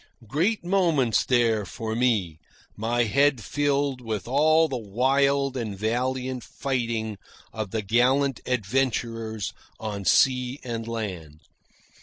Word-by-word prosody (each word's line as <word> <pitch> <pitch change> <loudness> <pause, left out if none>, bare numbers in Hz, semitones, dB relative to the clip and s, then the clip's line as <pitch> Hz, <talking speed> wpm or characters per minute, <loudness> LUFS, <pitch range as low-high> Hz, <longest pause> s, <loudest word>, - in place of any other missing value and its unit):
Great 175 - 0
moments, 165 - +2
these, 115 -5 +2
for 110 -1 -4
me, 105 -10 +1 0.4
my 120 +2 0
head 140 +3 +3
filled 140 +2 0
with 110 -3 -4
all 155 +5 +4
the 135 - -4
wild 135 +5 +1
and 110 -6 -4
valiant 125 +4 -1
fighting 115 -6 -3 0.3
of 110 -3 -4
the 110 +1 -2
gallant 130 +5 +2
adventurers 115 -2 -1 0.3
on 105 -2 -4
sea 125 +5 +3
and 115 -2 -4
land. 90 -10 -5
120 Hz, 115 wpm, -25 LUFS, 110-135 Hz, 0.4 s, all